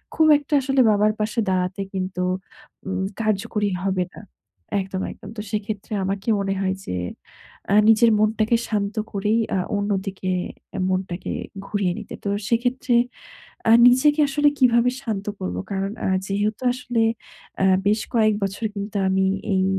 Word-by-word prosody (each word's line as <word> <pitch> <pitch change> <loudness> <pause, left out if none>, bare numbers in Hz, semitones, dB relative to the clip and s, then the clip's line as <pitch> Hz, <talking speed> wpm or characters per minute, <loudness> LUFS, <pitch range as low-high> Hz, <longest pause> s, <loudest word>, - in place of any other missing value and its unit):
খুব 315 - +4
একটা 295 +1 -7
আসলে 270 0 +2
বাবার 210 +1 +3
পাশে 215 +2 -1
দাঁড়াতে 185 +1 -1
কিন্তু 185 -1 -3 0.7
ম 190 0 -1 0.2
কার্যকরী 215 -1 0
হবে 190 -2 0
না। - - -10 0.6
একদম, 190 0 -4
একদম। - - -12
তো - - -2
সেক্ষেত্রে 210 -1 -4
আমাকে 195 +3 -2
মনে 195 -1 -1
হয় 190 0 0
যে - - -3 0.8
এ - - +5
নিজের 225 +1 +6
মনটাকে 215 +2 +2
শান্ত 205 -1 -1 0.2
করেই 210 +3 +1 0.2
আ - - +1 0.2
অন্যদিকে 195 -2 -2 0.6
মনটাকে 185 -1 -2 0.4
ঘুরিয়ে 195 -4 0
নিতে। 215 - -9
তো - - 0 0.2
সেক্ষেত্রে 245 +1 +1 0.8
আ - - +8 0.2
নিজেকে 290 +5 +4
আসলে 290 +1 +3
কিভাবে 245 -1 +4
শান্ত 215 -6 -3 0.2
করবো? 90 0 -3
কারণ 195 0 -1 0.2
আ - - +1 0.2
যেহেতু 205 +4 -1
আসলে 245 -2 -1 0.6
আ - - +4 0.2
বেশ 215 +1 +3
কয়েক 215 -2 +4
বছর 195 +3 -4
কিন্তু 200 +1 -4
আমি 190 0 +2 0.3
এই 190 0 +2
210 Hz, 145 wpm, -23 LUFS, 195-230 Hz, 0.8 s, আ